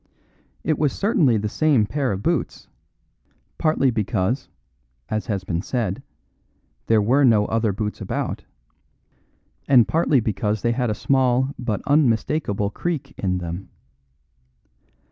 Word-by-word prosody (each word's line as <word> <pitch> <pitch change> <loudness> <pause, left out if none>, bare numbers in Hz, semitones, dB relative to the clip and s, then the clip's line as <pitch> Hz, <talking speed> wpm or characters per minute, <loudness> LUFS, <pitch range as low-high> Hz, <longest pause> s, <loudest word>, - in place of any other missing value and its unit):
It 155 -1 0
was 145 -3 +1
certainly 165 - +2
the 105 0 -2
same 140 -1 +2
pair 135 +2 -1
of 100 +1 -4
boots, - - -2 0.9
partly 145 -4 +2
because 110 +2 -1 0.6
(as 110 +2 -2
has 100 -5 -2
been 85 -2 -2
said) 105 -4 -2 0.9
there 110 -2 +4
were 130 +7 +3
no 110 -5 +4
other 115 -1 0
boots 105 +2 -4
about, - - -3 1.2
and 125 -4 +6
partly 160 -4 +2
because 105 -1 -2
they 120 - +2
had 125 0 0
a 105 - -1
small 130 +2 +1
but 110 -5 -2
unmistakable 120 -6 +1
creak 145 -1 -4
in 90 -2 -1
them. 90 +2 -6
115 Hz, 125 wpm, -22 LUFS, 105-140 Hz, 1.2 s, and